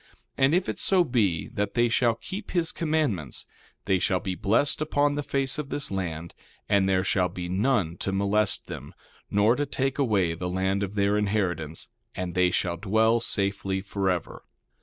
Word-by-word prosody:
And 135 +4 +3
if 180 +1 +1
it - - -3
so 185 -2 +3
be 105 - 0
that 100 0 -3
they 120 0 +4
shall 115 -1 +2
keep 190 - -7
his 170 -3 0
commandments 150 - -1 0.4
they 95 -1 +2
shall 95 0 +1
be 95 - -3
blessed 110 - +1
upon 145 -1 +2
the 145 - -1
face 135 0 -1
of 145 -2 -4
this 145 -5 -3
land, 85 -4 -4 0.3
and 100 -2 +3
there 95 -1 +2
shall 90 -2 +1
be 90 -1 -6
none 95 -3 +1
to 95 - -2
molest 100 +1 +1
them, - - -8 0.3
nor 105 +4 +3
to 145 +1 -1
take 135 0 -1
away 100 -10 +2
the 90 +2 -4
land 95 +2 0
of 100 0 -3
their 100 +1 +2
inheritance; 90 -7 -1 0.3
and 90 -2 -4
they 90 0 +3
shall 85 -1 -1
dwell 110 +4 +2
safely 100 -3 -1
forever. 95 -2 -2
100 Hz, 180 wpm, -26 LUFS, 95-130 Hz, 0.4 s, they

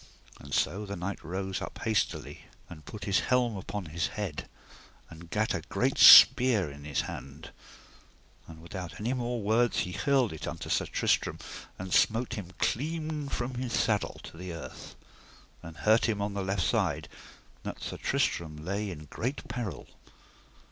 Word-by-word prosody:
And 70 - -12
so 100 +7 0
the 100 -1 -5
knight 90 +3 -5
rose 95 +2 -3
up - - -7
hastily 110 -2 -1 0.2
and 75 -4 -12
put 105 - -8
his 100 -2 +2
helm 125 -3 +1
upon 95 0 -5
his 80 +1 -2
head, 100 -8 -5 0.6
and 85 +1 -12
gat 110 +3 0
a - - -2
great - - 0
spear 110 - +9
in 70 0 -11
his 75 -2 0
hand; 70 +4 -8 1.0
and 80 0 -12
without 85 -2 -7
any 115 +5 -1
more 120 -1 -2
words 115 +3 +2
he 90 - -3
hurled 125 - +1
unto - - -5
Sir - - +1
Tristram, - - +1 0.4
and 95 -1 -5
smote 115 +2 +3
him 100 -6 -6
clean 155 +1 -2
from 125 0 -3
his 125 -1 -4
saddle 105 -3 0
to - - -11
the 90 +1 -6
earth, 75 -6 -9 0.7
and 85 -1 -10
hurt 110 +1 +4
him 105 -2 0
on 100 0 -2
the 100 - -2
left 95 -1 -1
side, - - 0 0.5
that - - -6
Sir - - -5
Tristram 80 -3 -1
lay 100 +3 -2
in 75 -4 -8
great 125 - -4
peril. 115 -5 -5
100 Hz, 160 wpm, -29 LUFS, 85-115 Hz, 1.0 s, spear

